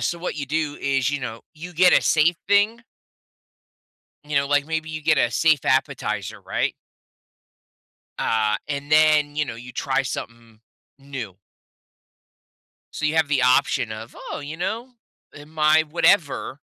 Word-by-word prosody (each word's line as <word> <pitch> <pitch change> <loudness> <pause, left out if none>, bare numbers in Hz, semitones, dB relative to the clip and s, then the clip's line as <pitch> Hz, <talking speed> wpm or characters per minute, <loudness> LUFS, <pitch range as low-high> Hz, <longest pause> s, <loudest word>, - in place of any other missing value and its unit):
So, 170 - -1
what 175 -1 -4
you 145 -2 -4
do 150 0 -2
is, 135 -1 +1
you 145 -1 -3
know, 115 -3 -6
you 175 +3 -9
get 180 +2 +5
a - - +2
safe 165 +2 +3
thing 205 +3 +3 1.4
you 150 -1 -3
know, 140 0 +2
like, 145 0 +1
maybe 160 0 -3
you 155 0 -6
get 155 -1 +3
a 120 - +2
safe 155 +4 +2
appetizer, 125 -7 -1
right? - - -2 1.5
Ah, 110 -1 +1
and 145 0 -5
then, 150 -1 +4
you 150 - +1
know, 125 - -6
you 125 +2 -11
try 135 +3 0
something 115 -3 -7 0.4
new. 135 -9 -7 1.5
So, - - -6
you 155 +1 +1
have 160 -2 +3
the 140 -3 +1
option 125 -3 +2
of, 110 +2 -9
"Oh, - - -4
you 145 +2 -7
know, 230 +8 -4 0.4
uh, 145 - -11
my" 155 0 +3
whatever. 160 -3 +1
145 Hz, 155 wpm, -23 LUFS, 130-160 Hz, 1.5 s, get